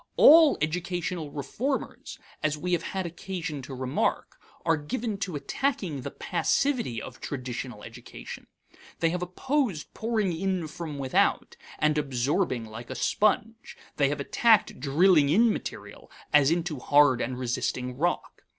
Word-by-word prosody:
All 315 Hz, -1 st, +8 dB
educational 175 Hz, 0 st, -2 dB
reformers, 225 Hz, -, -4 dB, 0.2 s
as 155 Hz, 0 st, 0 dB
we 180 Hz, +4 st, -3 dB
have 175 Hz, -2 st, +2 dB
had 190 Hz, +1 st, -4 dB
occasion 170 Hz, -3 st, -5 dB
to 130 Hz, +1 st, -8 dB
remark, 130 Hz, +1 st, -2 dB, 0.3 s
are 165 Hz, -1 st, +4 dB
given 205 Hz, +8 st, -4 dB
to 180 Hz, -4 st, -3 dB
attacking 185 Hz, -, -2 dB
the -, -, -5 dB
passivity 245 Hz, -, 0 dB
of -, -, -10 dB
traditional 125 Hz, -4 st, -5 dB
education. -, -, -10 dB, 0.5 s
They 165 Hz, -1 st, +2 dB
have 180 Hz, 0 st, -3 dB
opposed 205 Hz, -, -2 dB
pouring 215 Hz, -6 st, -1 dB
in 185 Hz, -1 st, -1 dB
from 155 Hz, -1 st, -6 dB
without, 135 Hz, -2 st, +1 dB, 0.2 s
and 150 Hz, 0 st, +2 dB
absorbing 135 Hz, -1 st, 0 dB
like 115 Hz, +2 st, -9 dB
a 130 Hz, -, -5 dB
sponge; 215 Hz, -, 0 dB, 0.2 s
they 140 Hz, -1 st, +3 dB
have 145 Hz, 0 st, -2 dB
attacked 220 Hz, -, +3 dB
drilling 150 Hz, +2 st, +4 dB
in 220 Hz, +7 st, +4 dB
material -, -, -8 dB, 0.2 s
as 145 Hz, -2 st, +6 dB
into 165 Hz, -3 st, -1 dB
hard 145 Hz, -2 st, +4 dB
and 130 Hz, -, -3 dB
resisting 125 Hz, 0 st, -2 dB
rock. 175 Hz, +6 st, -2 dB
160 Hz, 140 wpm, -27 LUFS, 140-195 Hz, 0.5 s, All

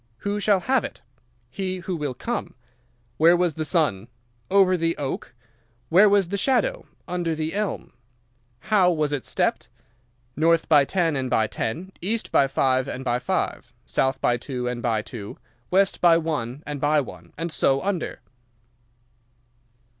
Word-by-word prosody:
"'Who 205 Hz, +1 st, -1 dB
shall 200 Hz, -2 st, +2 dB
have 260 Hz, +3 st, +1 dB
it?' -, -, -7 dB, 0.5 s
"'He 185 Hz, -1 st, -3 dB
who 180 Hz, 0 st, -4 dB
will 145 Hz, -5 st, -3 dB
come.' 235 Hz, -, -4 dB, 0.6 s
"'Where 170 Hz, +3 st, +6 dB
was 175 Hz, -2 st, +1 dB
the 155 Hz, -, -3 dB
sun?' 150 Hz, -, +1 dB, 0.4 s
"'Over 190 Hz, -1 st, +4 dB
the 165 Hz, -1 st, -1 dB
oak.' 135 Hz, -3 st, -5 dB, 0.5 s
"'Where 195 Hz, +5 st, +6 dB
was 200 Hz, -3 st, +3 dB
the 200 Hz, -, -1 dB
shadow?' -, -, +1 dB, 0.2 s
"'Under 175 Hz, -2 st, -1 dB
the 155 Hz, +1 st, -3 dB
elm.' 210 Hz, 0 st, -3 dB, 0.8 s
"How 190 Hz, -4 st, +5 dB
was 155 Hz, -3 st, 0 dB
it 140 Hz, -, -3 dB
stepped?' -, -, -1 dB, 0.7 s
"'North 165 Hz, +2 st, +2 dB
by 145 Hz, -3 st, +5 dB
ten 165 Hz, -2 st, 0 dB
and 130 Hz, -1 st, -2 dB
by 110 Hz, -3 st, +2 dB
ten, 115 Hz, -, -4 dB
east 220 Hz, +5 st, -2 dB
by 135 Hz, -, +4 dB
five 130 Hz, -1 st, +1 dB
and 130 Hz, -1 st, -5 dB
by 120 Hz, -1 st, +1 dB
five, -, -, -2 dB
south 130 Hz, -, 0 dB
by 120 Hz, -, +2 dB
two 125 Hz, 0 st, -4 dB
and 125 Hz, -1 st, -3 dB
by 115 Hz, -2 st, 0 dB
two, 105 Hz, -5 st, -8 dB, 0.3 s
west 195 Hz, +1 st, +2 dB
by 170 Hz, -2 st, +6 dB
one 150 Hz, -4 st, -3 dB
and 145 Hz, -2 st, -5 dB
by 150 Hz, +1 st, +3 dB
one, 90 Hz, -, -8 dB
and 165 Hz, +2 st, -3 dB
so 135 Hz, -2 st, +2 dB
under. 195 Hz, -4 st, -3 dB
160 Hz, 160 wpm, -24 LUFS, 130-185 Hz, 0.8 s, Where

